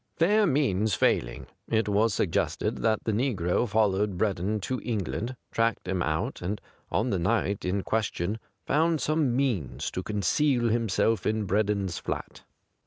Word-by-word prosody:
Fair 205 +5 +4
means 110 - +2
failing, - - +1 0.2
it 110 -2 +1
was 105 +2 +3
suggested 95 -3 0
that 110 -1 +1
the 110 - 0
negro 105 -3 0
followed 100 -2 +1
Breddon 100 +1 0
to 130 +5 -3
England, 115 +2 -2 0.2
tracked 115 -4 0
him 95 -1 -1
out, 80 -1 -1
and 100 +4 -2 0.3
on 115 +4 0
the 95 - 0
night 100 +2 0
in 95 +2 0
question 110 -2 -1 0.3
found 160 +2 +2
some 150 -5 +1
means 120 - -1
to 95 - -3
conceal 120 - +1
himself 115 -1 +1
in 110 -1 0
Bred 100 +2 +1
don's 100 -4 -1
flat. - - -5
110 Hz, 150 wpm, -27 LUFS, 95-120 Hz, 0.3 s, Fair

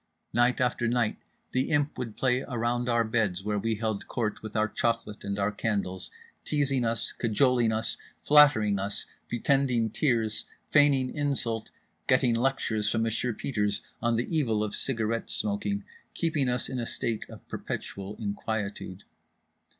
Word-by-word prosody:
Night 120 +1 +3
after 125 -1 +1
night 120 -2 +1 0.3
The 130 +1 0
Imp 145 0 +1
would 115 -4 -5
play 130 -1 +2
around 120 -1 -1
our 115 -1 +3
beds, 110 -5 0
where 105 0 0
we 115 +2 0
held 110 -1 -3
court 110 -4 -2
with 110 -1 -8
our 110 0 +3
chocolate 115 -1 -2
and 100 0 -3
our 100 +1 +1
candles; 100 -4 -2 0.3
teasing 140 -4 +1
us, 115 -2 0
cajoling 120 0 +2
us, 110 0 -1 0.3
flattering 125 -9 +6
us, 100 +1 -2 0.2
pretending 120 -2 +1
tears, 110 -6 +1 0.3
feigning 140 -3 +4
insult, 125 -6 -1 0.4
getting 130 -2 +4
lectures 115 -3 0
from 110 +1 +1
Monsieur 115 +2 0
Peters 105 -3 -1 0.2
on 120 -1 +2
the 120 +8 -1
evil 115 -9 +1
of 105 - -3
cigarette 115 -3 -1
smoking, 100 -1 +3 0.3
keeping 155 -6 +1
us 125 0 0
in 130 -1 -4
a 115 - -2
state 115 -2 -3
of - - -12
perpetual 100 +1 -5
inquietude. 100 -2 -4
115 Hz, 150 wpm, -28 LUFS, 105-125 Hz, 0.4 s, flattering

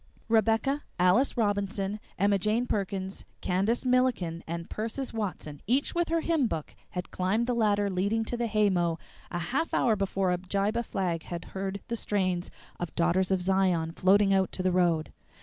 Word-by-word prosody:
Rebecca, 225 +6 +2 0.2
Alice 185 +11 +3
Robinson, 200 -1 0 0.2
Emma 200 +1 +3
Jane 215 +5 +1
Perkins, 195 -3 -3 0.2
Candace 200 +8 0
Milliken, 250 -10 +1
and 170 0 -4
Persis 230 +5 -3
Watson, 180 -9 -4
each 260 +5 +1
with 345 -1 0
her 330 0 +1
hymn 320 -7 +2
book, 155 -8 -4 0.2
had 180 0 -5
climbed 195 +6 +1
the 245 - 0
ladder 205 -3 +2
leading 200 +4 0
to 240 - -3
the 235 -1 -1
haymow 185 -6 +2 0.3
a 175 - -3
half 250 - -1
hour 230 -3 +3
before 195 -2 0
Abijah 195 +5 0
Flagg 180 -7 -2
had 170 -1 -6
heard 195 +1 -3
the 235 - -2
strains 185 -5 -1 0.3
of 175 - -5
"Daughters 175 +2 +2
of 190 -2 +1
Zion" 185 -4 +2
floating 195 +3 +4
out 190 -1 +2
to 185 - -3
the 185 - +2
road. 170 -3 +2
195 Hz, 165 wpm, -28 LUFS, 180-225 Hz, 0.3 s, floating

